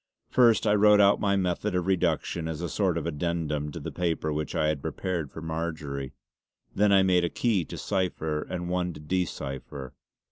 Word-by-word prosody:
First 120 -3 +5
I 105 - +4
wrote 105 0 +6
out 100 0 +5
my 100 -1 +2
method 95 +1 -1
of 90 -1 0
reduction 85 -3 0
as 80 -2 -4
a 85 -1 -3
sort 95 -1 +1
of 80 - -3
addendum 75 -2 -2
to - - -6
the - - -6
paper 80 -3 -1
which 75 0 -3
I 75 - +2
had 75 -2 -1
prepared 85 -4 -3
for 80 - -8
Marjory. 80 -4 -4 0.6
Then 105 +1 +3
I 95 -1 +6
made 90 -2 +3
a 85 - +1
key 105 -6 +1
to - - -8
cipher 85 -6 -1
and 90 -1 -5
one 90 0 -1
to - - -10
de 90 +5 0
cipher. 65 -2 -7
85 Hz, 200 wpm, -27 LUFS, 75-95 Hz, 0.6 s, wrote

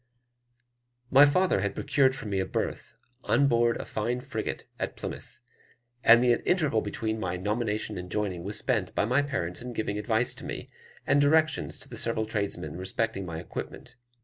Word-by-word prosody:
My 140 +2 +8
father 180 - +2
had 100 0 -2
procured 135 -2 +2
for 135 - -7
me 100 -2 -1
a 95 - 0
berth - - -3 0.3
on 140 - +3
board 120 -3 +3
a - - -6
fine 120 +3 -2
frigate 125 -4 -4
at - - -3
Plymouth, - - -7 0.7
and 115 +1 +7
the 120 -1 +5 0.2
interval 150 -11 +2
between 110 +1 -3
my 90 -3 -2
nomination 105 +1 -1
and 90 0 -7
joining 95 -5 -2
was 105 +3 -3
spent 105 -6 0
by - - +2
my 125 +6 +3
parents 105 -12 -3
in 125 0 -6
giving 105 -2 -2
advice 110 +3 +1
to - - -10
me, - - -6 0.3
and 145 - +4
directions 155 +2 +2
to - - -10
the - - -8
several 110 - 0
tradesmen 100 -8 -3
respecting 95 +1 -2
my 80 -1 -5
equipment. 125 +7 -7
110 Hz, 175 wpm, -28 LUFS, 100-125 Hz, 0.7 s, My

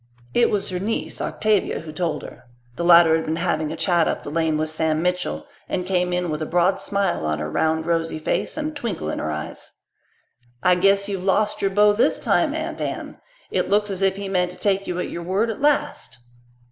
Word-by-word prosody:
It 240 - +4
was 205 -2 0
her 180 -1 -3
niece, 215 +4 -2
Octavia, 215 -2 0
who 160 -1 -8
told 155 -1 -2
her. - - -11 0.3
The 170 - -3
latter 170 -2 +7
had 160 - -4
been 155 - -1
having 165 -2 -1
a - - -4
chat 170 0 +2
up - - -2
the 145 - -6
lane 160 -1 +1
with 155 0 -1
Sam 155 0 0
Mitchell, 180 0 -1 0.2
and 180 -1 -2
came 180 -1 0
in 180 -2 -1
with 150 +1 -3
a 155 - -2
broad 180 +3 +2
smile 200 - -1
on 75 0 0
her 75 0 -4
round, 160 - +1
rosy 165 -1 0
face 155 - -2
and 310 0 -2
a - - -15
twinkle 220 - -3
in - - -4
her 80 - -2
eyes. 75 0 -6 0.9
"I 180 - +5
guess 195 +2 +3
you've 195 -3 -3
lost 205 +2 +1
your 195 - +2
beau 205 +1 +4
this 215 - +2
time, - - +1
Aunt - - -4
Anne. - - -5 0.3
It - - 0
looks 205 0 +2
as 190 0 -3
if 195 0 +2
he 200 0 -5
meant 180 -2 +1
to 180 - -11
take 195 -1 0
you 180 - -3
at 180 - -3
your 170 - -5
word 195 +6 0
at 220 - -8
last." 290 - 0
180 Hz, 225 wpm, -22 LUFS, 160-200 Hz, 0.9 s, latter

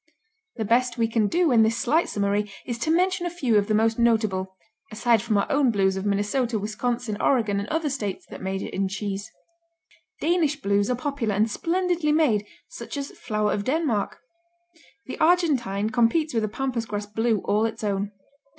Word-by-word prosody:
The 220 - -3
best 245 +2 +2
we 230 -1 +2
can 225 -2 +1
do 340 - +2
in 230 -2 +5
this 220 +1 +2
slight 290 +7 +1
summary 205 0 0
is 240 -2 -4
to 310 - -2
mention 355 +1 +2
a - - -1
few 260 -11 +2
of 200 - -2
the 215 - +1
most 225 +1 +2
notable, 210 -5 +1 0.3
aside 225 0 +2
from 220 -2 0
our 200 - +2
own 280 -2 +3
Blues 195 -3 +2
of 190 +1 -3
Minnesota, 220 +4 0
Wisconsin, 215 +1 -3
Oregon 220 -7 +2
and 205 - -5
other 320 -1 0
states 220 -9 -3
that - - -8
major 190 0 -3
in 195 0 -2
cheese. 200 0 -4 0.9
Danish 315 -3 +1
Blues 200 -3 +1
are 250 - +1
popular 250 -5 -2
and 215 +2 +2
splendidly 345 - 0
made, 245 -10 +2 0.2
such - - -8
as 280 0 -4
"Flower 210 -1 -2
of 200 - -2
Denmark." 260 -6 0 0.9
The - - -7
Argentine 265 - +2
competes 245 +8 +2
with 225 -2 +1
a - - -2
pampas 235 0 -3
grass 205 0 -3
Blue 225 +2 0
all 210 +2 +2
its 225 0 -7
own. 200 0 -1
225 Hz, 185 wpm, -25 LUFS, 205-275 Hz, 0.9 s, in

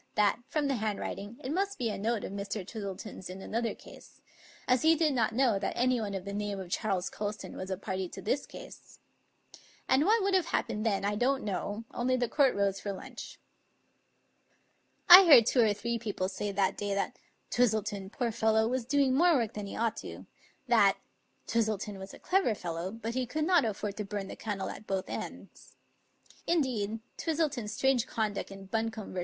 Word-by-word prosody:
that, 210 +1 +3
from 300 -2 0
the 275 - +1
handwriting, 210 0 -4
it 260 - -3
must 395 +3 -1
be 235 -3 -1
a - - -3
note 225 +2 -1
of - - -5
Mr. 200 0 -4
Twistle 200 -4 -5
ton's 190 -4 -8
in 185 +1 -7
another 230 +4 -2
case; - - -15 0.5
as 250 -1 +3
he 320 +1 +5
did 315 -2 +2
not 235 -4 +1
know 245 -6 +3
that 195 - -2
anyone 240 -5 +1
of 190 -1 -5
the 200 - -5
name 205 -1 -3
of 180 -2 -8
Charles 195 -4 0
Colston 210 0 -5
was 185 - -6
a 190 - -2
party 190 -2 -3
to - - -9
this 265 +7 -1
case. - - -12 0.9
And 265 +2 +4
what 435 +1 +4
would 395 0 +1
have 370 -3 +3
happened 215 +2 -1
then 200 -2 0
I 205 - +1
don't 265 +5 +1
know; 205 +2 -3
only 255 +1 +1
the 245 -1 0
court 270 +1 +3
rose 200 -1 +1
for 205 - -4
lunch. 195 - -9 1.7
I 365 +2 +12
heard 280 -9 +9
two 245 +1 +3
or 220 -2 +4
three 235 +3 -2
people 205 -4 -2
say 205 +1 -3
that 195 -1 +1
day 205 -1 -2
that 200 - -2 0.3
"Twis 245 -1 +4
tleton, 205 -3 -3
poor 235 -1 -1
fellow, 220 0 +2
was 250 0 -1
doing 275 0 +2
more 340 +4 +5
work 230 -5 0
than 210 -1 -5
he - - -7
ought 230 0 0
to"; - - -8 0.4
that - - +5 0.5
"Twistleton 215 -3 -1
was 190 0 -8
a - - -11
clever 365 - +1
fellow, 170 0 -4
but 230 +1 -5
he 255 0 -1
could 305 +5 -1
not 350 -5 +4
afford 210 -1 -3
to 210 - -3
bum 200 -1 -4
the - - -6
candle 205 -3 -4
at 215 - -11
both 190 -1 -2
ends." - - -8 0.7
Indeed, 230 -10 0 0.2
Twis 325 -2 -1
tleton's 270 -10 -1
strange 260 0 +2
conduct 215 -3 -2
in 195 0 -10
Buncombe 220 +1 -3
v. 185 - -3
220 Hz, 200 wpm, -30 LUFS, 200-255 Hz, 1.7 s, I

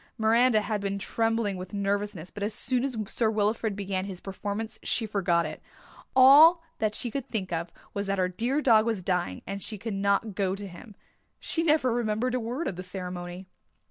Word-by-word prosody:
Miranda 225 0 +4
had 210 -1 -2
been 200 0 -2
trembling 225 -1 0
with 185 +3 -7
nervousness 200 -3 -2
but 205 - -9
as 210 +1 -1
soon 250 -1 0
as 265 -4 -2
Sir 225 +3 0
Wilfrid 215 0 0
began 195 -1 -2
his 190 -3 -6
performance 205 +3 -5
she 230 - 0
forgot 180 -5 +1
it. 155 - -7 0.5
All 300 +6 +8 0.2
that 215 -1 0
she 240 - -3
could 275 0 -4
think 190 -6 -3
of 170 +1 -3 0.2
was 200 0 -3
that 195 0 0
her 185 -1 +2
dear 240 +11 -1
dog 225 -3 +5
was 220 -5 -1
dying 175 - -1
and 200 +1 -5
she 215 - -4
could 220 +2 -5
not 200 +2 +1
go 190 -1 0
to 200 0 -7
him. 195 +4 -12 0.4
She 330 - -1
never 300 -6 +3
remembered 235 +1 0
a 255 - +1
word 245 +8 -3
of 175 - -4
the - - -4
ceremony. 180 0 -6
205 Hz, 200 wpm, -27 LUFS, 190-230 Hz, 0.5 s, All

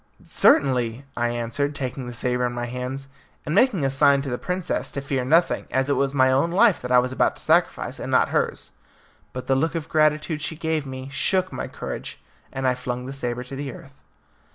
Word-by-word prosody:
"Certainly," 125 -2 +2
I 120 - +1
answered, 120 +5 -2
taking 130 -2 -4
the 120 - -6
sabre 125 0 0
in 120 - -5
my 120 0 -3
hands, 125 +3 -5 0.4
and 150 - -2
making 200 - +3
a 135 - +1
sign 140 0 +4
to 135 - -4
the 125 - -2
princess 180 -1 -2
to - - -4
fear 135 -2 -2
nothing, 165 +7 +2
as 135 +2 0
it - - +3
was 140 0 0
my 130 -1 +4
own 135 +6 +2
life 200 +3 +4
that 125 - -5
I 125 - +6
was 125 +1 +2
about 130 - +1
to - - -11
sacrifice, - - +1
and - - -5
not - - +4
hers. - - -1 0.6
But 130 - -6
the 135 - +2
look 160 +5 0
of 160 -1 -4
gratitude 155 0 +1
she 160 +2 -3
gave 160 -2 -2
me 130 0 -7
shook 185 +5 +1
my - - -4
courage, - - -7 0.3
and 135 0 -2
I 130 - +3
flung 125 0 -4
the 135 - -6
sabre 125 -2 -3
to 130 +2 -8
the 140 0 -4
earth. 135 +1 -14
135 Hz, 220 wpm, -24 LUFS, 125-150 Hz, 0.6 s, I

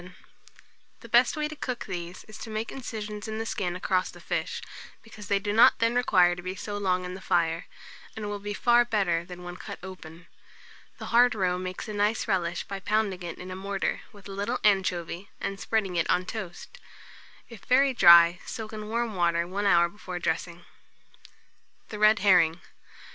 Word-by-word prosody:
The 235 - -12
best 245 +7 +4
way 300 0 0
to 310 - -8
cook 255 -4 -4
these 175 -2 -6
is 215 - -12
to - - -8
make 220 +1 -4
incisions 215 -5 -6
in 220 0 -4
the 225 - -3
skin 200 -6 -2
across 185 0 0
the - - -12
fish, - - -3 0.4
because 220 -2 -12
they 200 - +2
do 205 +1 -2
not 225 +3 +6
then 230 +1 +1
require 185 -8 +4
to 180 - -8
be 185 +1 -5
so 205 +1 -6
long 185 -2 0
on 180 - -6
the 190 - -9
fire, 165 -1 0 0.5
and 215 -1 -5
will 205 0 -4
be 205 0 -5
far 240 0 +4
better 195 -8 0
than 180 0 -10
when 175 0 -7
cut - - -8
open. 180 -3 -10 0.7
The - - -7
hard 245 0 +5
roe 180 -3 0
makes 185 +2 -5
a 215 - -5
nice 210 +2 0
relish 175 -2 -1
by 195 - -6
pounding 205 -2 0
it 170 -1 -6
in 185 +1 -8
a - - -5
mortar, 195 +1 -2
with 205 -1 -14
a - - -8
little 205 +6 -2
anchovy, 185 -2 0
and 195 0 -4
spreading 200 -5 -1
it 165 - 0
on 180 - +2
toast. 215 - -7 0.7
If 230 -3 -13
very 270 +2 +4
dry, 170 -4 +7
soak 220 -1 -7
in 215 -1 -6
warm 230 0 -1
water 170 -2 +1
1 195 +4 -3
hour 170 -3 +5
before 180 -1 -8
dressing. 170 0 -3 1.2
THE 210 - -7
RED 215 0 +5
HERRING. 175 -3 +5
195 Hz, 190 wpm, -27 LUFS, 180-220 Hz, 1.2 s, dry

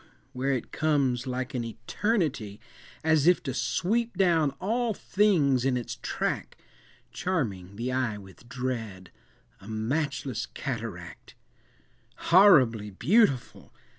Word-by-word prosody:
where 135 +2 -1
it 125 - -4
comes 140 -5 0
like 130 +2 -3
an 125 -2 -2
eternity, 115 - -2 0.4
As 160 -1 +3
if 180 - +4
to 130 - -3
sweep 200 - -1
down 170 -6 +3
all 225 +3 0
things 165 - +2
in 130 -1 +1
its 120 - -5
track, - - -3 0.5
Charming 100 - -3
the 120 +4 -3
eye 125 -4 -1
with 100 +4 -15
dread,—a 120 -1 -7
matchless 130 +2 -2
cataract, 115 - -7 0.8
"Horribly 135 - +5
beautiful! 140 - +1
130 Hz, 105 wpm, -27 LUFS, 115-160 Hz, 0.8 s, Horribly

